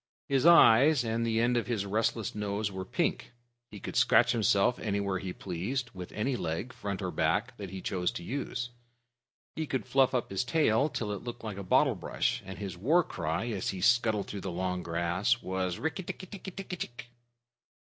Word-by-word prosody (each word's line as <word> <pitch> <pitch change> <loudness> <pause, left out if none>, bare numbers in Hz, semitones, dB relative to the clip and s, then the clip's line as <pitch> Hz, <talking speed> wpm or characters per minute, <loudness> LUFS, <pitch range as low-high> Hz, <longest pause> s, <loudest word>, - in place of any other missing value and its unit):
His 135 +3 +3
eyes 145 -3 +7
and 115 0 -1
the 115 -1 +1
end 120 +1 +2
of 120 - -1
his 110 -5 -1
restless 110 +1 0
nose 105 0 -2
were 95 -1 -5
pink. 95 - -1 0.4
He 105 - -9
could - - -7
scratch 120 - +5
himself 110 0 +2
anywhere 100 -2 -1
he 95 -1 -5
pleased 100 +10 -3
with 90 -2 -8
any 125 +5 -1
leg, 90 +6 -3
front 100 -1 -4
or 90 - -2
back, 105 +12 0
that 100 -3 -6
he 95 0 -7
chose 90 -2 0
to 85 - -6
use. 120 +1 -4 0.8
He 160 -1 -3
could 130 - -2
fluff 135 -1 +3
up 120 - -1
his 95 - 0
tail 140 -1 +2
till 110 -7 -3
it 100 - -5
looked 120 -1 -7
like 105 -3 -5
a - - -4
bottle 90 - +4
brush, - - -1
and 95 - -7
his 100 -3 -5
war 150 - +3
cry 90 - -3
as 100 -5 -2
he 95 - -3
scuttled 110 0 +3
through 100 - -6
the 95 - -4
long 90 +1 -2
grass 85 +8 0
was: 95 -1 -2
"Rikk 160 +3 -2
tikk - - -6
tikki 190 +1 -9
tikki 190 +1 -7
tchk!" 175 -12 -6
105 Hz, 200 wpm, -30 LUFS, 95-125 Hz, 0.8 s, eyes